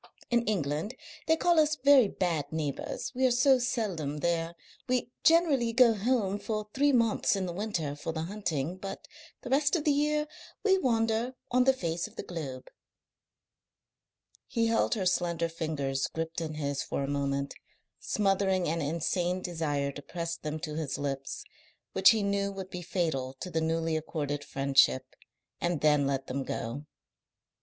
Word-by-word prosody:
In 240 0 +4
England 170 - -1 0.3
they 320 +1 +4
call 345 0 +3
us 305 0 +3
very 275 -4 +6
bad 170 -6 -1
neighbours, 150 -3 -3
we 260 +1 -1
are - - +3
so 250 +2 +4
seldom 200 - -2
there. 165 +2 -1 0.3
We 250 -1 0
generally 295 -9 +4
go 240 -1 +6
home 205 -2 0
for 215 -1 -3
three 285 +2 +3
months 230 -5 +2
in 195 -1 -1
the 175 - -4
winter 175 -7 -2
for 150 - -4
the 160 0 -3
hunting, 175 -4 -3
but 195 +1 -7 0.3
the 250 - -7
rest 290 +4 +3
of 320 - 0
the 300 - +3
year 300 +1 +1 0.4
we 385 -2 +4
wander 230 -1 +1 0.2
on 250 +1 +4
the 265 - +7
face 170 -8 -2
of - - -18
the - - -5
globe." 140 -7 -6 1.8
He 230 -3 +1
held 225 +1 +2
her 195 -4 -2
slender 170 -2 +1
fingers 150 -5 -2
gripped 165 +1 -4
in 155 -1 -4
his 140 -2 -2
for - - -2
a - - -2
moment, 140 0 -1 0.5
smothering 195 -3 +1
an 165 +2 -1
insane 175 +4 -1
desire 145 -5 -1
to 145 - -9
press 170 +2 -4
them 155 -1 -5
to 155 -3 -4
his 155 -3 -3
lips, 135 -1 -4 0.5
which 190 0 +7
he 220 -2 +3
knew 200 0 0
would 190 -1 -7
be 180 - -5
fatal 160 -7 -2
to 180 - -6
the 160 - 0
newly 165 0 0
accorded 145 -2 -3
friendship, 135 - +2 0.5
and 175 -3 0
then 150 -2 +4
let 135 -1 -1
them 135 +1 -3
go. 130 +5 -5
175 Hz, 165 wpm, -30 LUFS, 150-230 Hz, 1.8 s, the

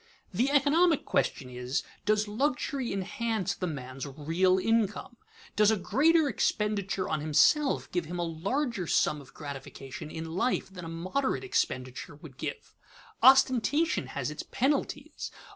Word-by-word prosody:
_ - - -31 0.3
The 240 +9 +2
economic 295 +3 +3
question 130 - 0
is, 125 +2 -2 0.2
Does 215 0 +2
luxury 255 +2 -1
enhance 200 +1 -2
the 185 - -3
man's 135 -3 -6
real 165 +7 +1
income? 225 +3 0 0.4
Does 210 0 +5
a 220 - +3
greater 305 - +3
expenditure 200 -6 0
on 155 - -1
himself 270 - +3
give 175 -2 -1
him 175 +3 -5
a 175 - -1
larger 195 - -2
sum 150 -1 +2
of 135 - -17
gratification 135 -1 -8
in 160 +1 -6
life 195 +1 0
than 180 -3 -8
a - - -6
moderate 185 - -2
expenditure 130 - -2
would 145 -3 -13
give? - - -6 0.5
Ostentation 265 +4 +4
has - - -3
its - - -5
penalties. 285 +2 -2
200 Hz, 145 wpm, -29 LUFS, 160-265 Hz, 0.5 s, Does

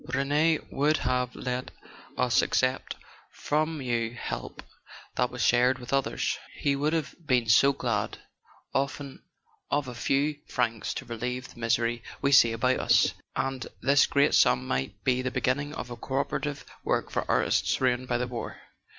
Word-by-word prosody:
Rene 150 +4 +2
would 150 +3 +2
have 125 0 -1
let 125 0 -3 0.5
us - - +3
accept 130 +1 0 0.4
from 155 0 -1
you 120 -2 -1
help - - -5 0.5
that 125 - +1
was 125 -3 -3
shared 125 +4 +4
with 125 +1 -7
others: 135 -1 0 0.2
he 140 -1 +1
would 145 +2 0
have 160 -2 -1
been 125 -6 +2
so 135 +5 +6
glad, 120 -6 -2 0.6
often, 140 0 -2 0.5
of 145 -2 0
a 125 - -6
few 140 +4 0
francs 115 -3 -1
to 135 - -5
relieve 125 +2 -4
the - - -16
misery 115 0 +1 0.2
we 140 - +1
see 120 -4 +7
about 125 +3 +1
us. - - +4 0.2
And 135 -1 -2
this 140 0 +4
great 140 0 +3
sum 65 - +4
might 65 +11 -3
be 130 -1 +2
the 130 - -1
beginning 145 +4 -1
of 125 - -6
a - - -4
co 130 +3 -6
operative 145 +1 -2 0.2
work - - -1
for - - -1
artists - - +2
ruined 130 -1 +1
by 120 - +1
the 125 - -1
war." 120 -1 -6
130 Hz, 165 wpm, -28 LUFS, 120-140 Hz, 0.6 s, see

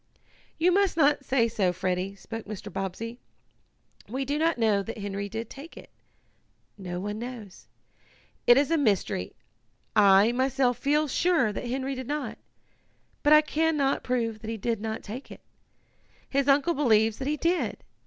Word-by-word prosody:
"You 345 +3 +3
must 390 -2 +2
not 290 -2 +3
say 255 -3 +2
so, 200 -5 +1
Freddie," 185 +2 -2
spoke 225 +2 -8
Mr. 205 -2 -7
Bobbsey. 195 +5 -5 0.9
"We 265 +4 -2
do 290 +3 -1
not 325 -1 +2
know 215 -4 +2
that 225 +3 -7
Henry 200 -1 -4
did 225 +2 -5
take 285 +8 -11
it. - - -12 0.8
No 180 -3 -6
one 205 +3 -4
knows. 235 -5 -9 0.8
It 240 - +8
is 285 +3 +2
a 330 - +3
mystery. 200 - 0 0.6
I, 200 +1 +6
myself 260 0 +1
feel 300 +2 +2
sure 290 -6 +2
that 240 - -5
Henry 265 +2 -2
did 260 -2 -6
not, 295 0 -4 0.8
but 295 - +2
I 305 0 +9
can 315 +1 0
not 275 -1 +1
prove 230 -3 -1
that 220 - -8
he 225 - -3
did 225 0 -2
not 220 0 -4
take 235 +6 -8
it. - - -11 0.9
His 275 0 0
uncle 285 +4 +4
believes 225 -7 +2
that 265 - -3
he 300 +1 0
did. 345 +4 -1
240 Hz, 165 wpm, -27 LUFS, 210-285 Hz, 0.9 s, I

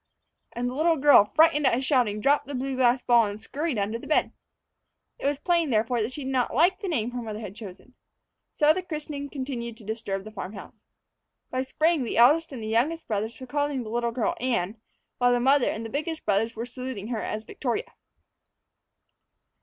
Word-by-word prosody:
And 240 +1 -2
the 250 - -3
little 320 +4 +2
girl, 275 -7 +6
frightened 305 -3 +5
at - - +3
his 260 +2 -2
shouting, 240 -7 +2
dropped 285 +3 +2
the 285 - -5
blue 265 +1 -2
glass 250 0 +3
ball, 235 -2 +4
and 205 +1 -6
scurried 290 +4 -3
under 210 +3 -1
the - - -10
bed. 310 - +2 0.9
It - - -1
was 285 0 0
plain, 335 0 +1
therefore, 230 +1 +1
that 215 +4 -2
she 285 +2 -6
did 265 - -3
not 255 -3 0
like 355 +6 +4
the 405 - -5
name 245 -9 -1
her 245 0 -4
mother 215 -2 -5
had 205 -3 -8
chosen. 215 +3 -11 0.6
So 300 +1 +4
the 370 - -2
christening 300 -4 -6
continued 250 -5 -5
to 225 - -12
disturb 205 -2 -4
the 215 - -10
farm 195 -1 -6
house. 200 - -11 0.7
By 255 - 0
spring 310 +3 +1
the 235 - -3
eldest 295 +8 +5
and 245 -5 -7
the - - -4
youngest 260 +10 0
brothers 220 +2 -3
were 260 - -7
calling 285 -1 -1
the 215 - -8
little 235 0 0
girl 230 -1 0
Anne, 225 -4 -1 0.4
while 245 0 +4
the 245 - +3
mother 270 +1 +4
and 225 +1 -4
the 225 - -7
biggest 310 +3 -3
brother 210 +2 +2
were 230 +2 -4
saluting 250 -4 -6
her 230 -3 -2
as 215 0 -4
Victoria. 250 - -4
250 Hz, 210 wpm, -26 LUFS, 225-290 Hz, 0.9 s, girl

